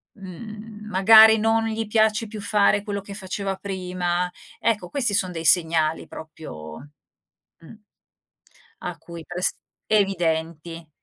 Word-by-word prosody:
mhmm, 210 +2 -10
magari 220 +3 +7
non 225 +1 +1
gli 225 0 -3
piace 220 +1 +2
più 215 0 -8
fare 205 -1 +2
quello 200 -1 -4
che 200 +1 -10
faceva 195 0 -4
prima, 180 -2 -3 0.3
ecco 210 -6 -1
questi 245 -4 0
son 185 -2 0
dei 165 -1 -6
segnali 160 -1 +3
proprio, 105 - -10 0.7
mh, 165 - -14 1.1
a 175 -2 -6
cui 170 +1 -10
prest 180 +1 0 0.3
evidenti. 165 -5 -1
190 Hz, 120 wpm, -23 LUFS, 170-215 Hz, 1.1 s, magari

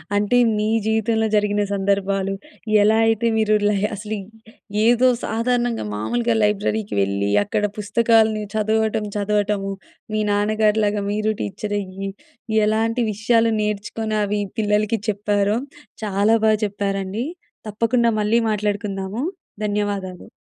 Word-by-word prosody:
అంటే 205 +4 +2 0.2
మీ 210 - 0 0.2
జీవితంలో 220 0 +1
జరిగిన 205 0 +2
సందర్భాలు, 195 0 0 0.5
ఎలా 220 +1 +4
అయితే 225 +1 +2
మీరు 215 -1 +3
లే 210 - +2 0.2
అసలు 210 +2 -5 0.7
ఏదో 245 +2 +5 0.2
సాధారణంగా 240 - 0
మామూలుగా 230 - 0
లైబ్రరీకి 210 0 0
వెళ్ళి, 100 +1 0
అక్కడ 205 - -2
పుస్తకాల్ని 220 0 +2
చదవటం 220 0 +1
చదవటము. 205 -1 0 0.4
మీ 215 - 0
నాన్నగారిలాగా 210 0 +1
మీరు 215 +1 0
టీచర్ 205 - -3
అయ్యి, 195 +1 -6 0.6
ఎలాంటి 225 +3 +1
విషయాలు 225 +2 +2
నేర్చుకొని, 210 +1 -2
అవి 205 +1 -1 0.2
పిల్లలకి 210 +1 +1
చెప్పారో, 205 +1 +1 0.5
చాలా 205 +2 +2
బాగా 215 -1 +4
చెప్పారండి. 200 +2 -2 0.4
తప్పకుండా 230 +2 +1
మళ్ళీ 210 +2 +2
మాట్లాడుకుందాము. 205 +1 -2 0.4
ధన్యవాదాలు. 205 -3 -3
210 Hz, 110 wpm, -21 LUFS, 200-220 Hz, 0.7 s, ఏదో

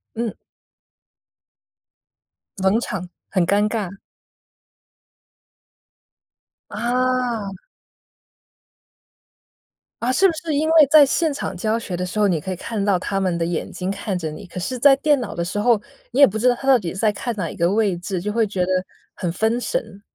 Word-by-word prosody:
嗯。 230 -2 -2 2.3
冷 190 +4 +3
场， 180 -6 -5 0.2
很 185 -4 +1
尴 205 +2 +2
尬。 200 -4 -4 2.7
啊。 240 -3 -1 2.4
啊， 250 +2 +1
是 385 +8 +4
不 - - +1
是 315 -1 -3
因 310 +2 +1
为 315 -3 +7
在 305 -2 +9
现 300 +2 0
场 280 - -4
教 215 +4 0
学 195 -6 -4
的 180 +1 -3
时 210 +4 -3
候， 205 - +4
你 170 -5 +1
可 190 +4 -5
以 - - -4
看 225 +4 -5
得 200 - 0
到 195 -2 +3
他 195 +1 -2
们 185 -3 0
的 165 - -1
眼 170 -1 -3
睛 185 +1 -4
看 195 -1 -3
着 160 -3 -3
你。 185 +6 -9
可 180 +1 -7
是 255 +8 -3
在 275 +2 +7
电 290 0 +2
脑 235 - -5
的 170 - -2
时 195 +4 -4
候， 225 -1 +3 0.3
你 270 - +1
也 280 - +10
不 220 +2 -3
知 250 +3 +3
道 245 - +4
他 270 +3 -6
到 265 - +7
底 175 -7 -4
是 190 - -5
在 215 -2 +3
看 225 +3 -4
哪 180 -6 -3
一 - - -9
个 170 +3 +1
位 205 -4 +1
置， 180 0 -4
就 210 +3 -3
会 225 -1 +2
觉 195 -2 -4
得 - - -4 0.5
很 175 -2 -2
分 220 +5 0
神。 245 - -4
210 Hz, 195 characters per minute, -21 LUFS, 185-245 Hz, 2.7 s, 也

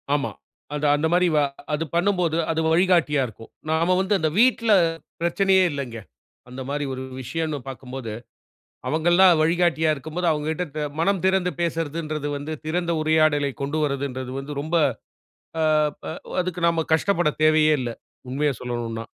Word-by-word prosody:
ஆமா, 140 - -1 0.4
அது 150 0 -2
அந்த 150 +2 +1
மாரி 180 +1 +4
வ - - +5 0.3
அது 150 +2 0
பண்ணும்போது, 175 -3 +1
அது 160 - -1
வழிகாட்டியா 165 -5 +3
இருக்கும். 115 0 -13 0.2
நாம 165 +3 +2
வந்து 195 +2 0
அந்த 160 - +1
வீட்ல 230 -2 +4 0.5
பிரச்சனையே 190 +2 +3
இல்லங்க. 135 -5 -5 0.5
அந்த 130 +1 -7
மாரி 145 0 -2
ஒரு 130 - -5 0.2
விஷயன்னு 155 +3 -3
பார்க்கும்போது, 130 -3 -7 0.7
அவுங்கல்லாம் 175 +4 +5
வழிகாட்டியா 165 -1 +2
இருக்கும்போது 160 +5 -3
அவுங்ககிட்ட 155 +3 -2
பே 155 - -2 0.2
மனம் 195 +2 +1
திறந்து 190 -1 +2
பேசுறதுன்றது 160 -2 -2
வந்து 145 +2 -6
திறந்த 170 +2 -1
உரையாடலைக் 155 -3 +2
கொண்டு 145 +3 -2
வர்றதுன்றது 135 -3 -3
வந்து 140 +2 -6
ரொம்ப 160 +4 -2 0.9
ஆ, - - +3 0.4
ப - - -9 0.4
அதுக்கு 180 -1 -4
நம்ம 165 -1 +1
கஷ்டப்படத் 165 -3 +1
தேவையே 155 0 +5
இல்ல. 120 - -3 0.4
உண்மைய 145 +3 +1
சொல்லணுன்னா. 120 -2 -4
155 Hz, 140 wpm, -23 LUFS, 145-175 Hz, 0.9 s, வ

